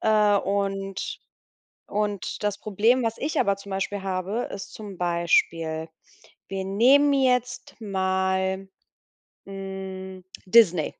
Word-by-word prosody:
Äh, 210 -1 +4
und 195 -1 -2 0.7
und 205 -1 -2
das 205 -1 -1
Problem, 220 +5 +2
was 225 -1 -2
ich 300 +3 -2
aber 200 -1 +2
zum 200 0 -12
Beispiel 195 +1 -2
habe, 190 +4 -2
ist 195 - -8
zum 205 -3 -8
Beispiel 165 -2 +1 0.6
wir 195 -1 -3
nehmen 265 +9 +5
jetzt 250 -2 0
mal, 190 -1 0 0.8
hm, 190 -1 -7 0.2
Disney. 180 -6 +5
195 Hz, 110 wpm, -25 LUFS, 190-215 Hz, 0.8 s, nehmen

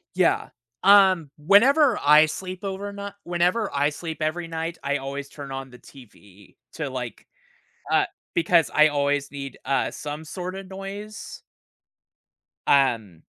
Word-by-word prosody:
Yeah. - - +2 0.3
Um, 190 -5 +6
whenever 235 - +5
I 150 +2 +7
sleep 185 +4 -6
over 200 +1 -4
ni 200 0 -6
whenever 175 +5 +1
I 145 +1 +2
sleep 160 +1 -7
every 165 +2 -2
night, 165 +1 -4
I 140 +1 0
always 140 +1 -6
turn 140 -2 -9
on 135 0 -6
the 125 - -14
TV 105 -7 -17 0.2
to, 150 -4 -4
like, 125 -4 -6 0.6
uh, - - +4 0.3
because 170 -1 +3
I 155 +1 +6
always 145 -1 0
need, 140 -2 -7
uh, 135 +1 0
some 150 +1 -6
sorta 185 +3 -6
noise. 195 +3 -8 1.3
Um, 115 - +2
155 Hz, 135 wpm, -24 LUFS, 140-190 Hz, 1.3 s, I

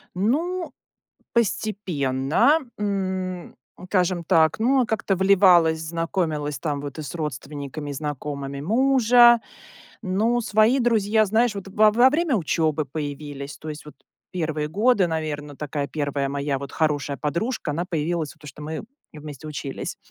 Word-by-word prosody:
Ну, 325 - -1 0.6
постепенно. 190 - +1 0.2
М, 190 -3 -3 0.3
скажем 180 -2 0
так, 160 -3 +3
ну, 260 +4 +3
я - - +3
как-то 215 -3 0
вливалась, 180 -4 +5
знакомилась, 160 -3 -2
там, 145 -1 -2
вот 145 +1 -7
и - - -4
с 150 - -7
родственниками 145 -1 -5
и - - -3
знакомыми 140 -1 -5
мужа. 240 - +5 0.6
Ну, 220 +4 +1
свои 220 +4 +3
друзья, 220 -3 +3
знаешь, 220 +3 +2
вот, 195 -1 -6
во 210 +2 +4
во 240 +4 +6
время 305 -1 +1
учебы 155 -4 0
появились, 145 0 -6
то 155 - -8
есть, 150 0 -8
вот, 150 - -12 0.4
первые 155 -4 -2
годы, 205 +3 +2
наверно, 150 -3 -4
такая 145 -1 -3
1 145 -2 -2
моя, 140 0 -2
вот, 140 -1 -7
хорошая 145 -3 -1
подружка, 170 - -2
она 165 +4 -2
появилась, 165 -2 -2
потому 155 -1 -14
что 140 +2 -11
мы 155 +1 -5 0.3
вместе 150 -1 -9
учились. 145 -2 -5
165 Hz, 140 wpm, -23 LUFS, 150-210 Hz, 0.6 s, во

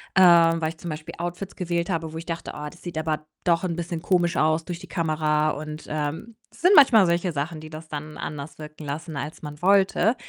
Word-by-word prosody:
ähm, 170 -3 +6
weil 155 - +1
ich 165 - -9
zum 175 - -6
Beispiel 155 +2 -6
Outfits 175 +3 -5
gewählt 170 0 -2
habe, 165 -2 -2
wo - - -5
ich 165 - -7
dachte: 165 -1 -4
„Oh, 150 0 -5
das 175 - -17
sieht 175 -3 -6
aber 155 -1 -2 0.2
doch 170 -1 +2
'n 170 - -1
bisschen 170 -1 -4
komisch 175 -2 +2
aus 155 +1 +2
durch 175 -1 -5
die 185 - -11
Kamera.“ 155 -2 +1
Und, 155 +1 -6
ähm, 155 +10 -3 0.2
es - - -17
sind 360 +3 +5
manchmal 235 -9 +8
solche 170 +1 +1
Sachen, 155 +3 -3
die 155 - -9
das 155 +1 -9
dann 150 +1 -6
anders 150 +1 -6
wirken 150 0 -9
lassen, 150 +2 -5
als 150 +3 -5
man 150 0 -8
wollte. 195 +5 +4
165 Hz, 225 wpm, -25 LUFS, 155-175 Hz, 0.2 s, manchmal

